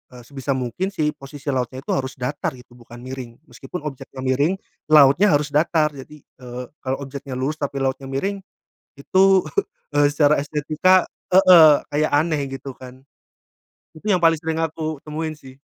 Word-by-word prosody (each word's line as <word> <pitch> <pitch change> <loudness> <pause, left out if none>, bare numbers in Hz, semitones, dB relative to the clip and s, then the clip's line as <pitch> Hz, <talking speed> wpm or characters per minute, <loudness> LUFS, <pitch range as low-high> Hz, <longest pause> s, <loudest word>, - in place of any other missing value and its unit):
eee, 125 - -12
sebisa 135 +2 -4
mungkin 130 +8 -2
sih, 160 -6 -1
posisi 140 0 -7
lautnya 130 0 -3
itu - - -4
harus 130 -1 -2
datar 130 +1 -3
gitu, 125 0 -17
bukan 120 0 -14
miring. 130 -2 -8 0.2
Meskipun 135 +7 -8
objeknya 135 -2 -7
miring, 140 +7 +1 0.3
lautnya 150 +5 +6
harus 145 0 -1
datar. 155 0 +2
Jadi, 145 +1 -12
eee, 125 0 -9 0.2
kalau 130 0 -3
objeknya 135 -1 -7
lurus 140 +4 -2
tapi 140 -1 -3
lautnya 135 0 -2
miring, 190 +10 -2 0.5
itu, 190 +7 +3 0.6
eee, 145 - +5
secara 150 0 +4
estetika 155 +5 +2 0.2
heeh. 170 -6 +8
Kayak 150 +1 0
aneh 155 0 +2
gitu 135 -1 -8
kan. 130 0 -12 0.9
Itu 160 +7 -8
yang 180 -4 +2
paling 165 -1 +4
sering 160 0 -1
aku 155 0 -4
temuin 155 +1 -4
sih. 135 -2 -15
145 Hz, 160 wpm, -21 LUFS, 130-155 Hz, 0.9 s, heeh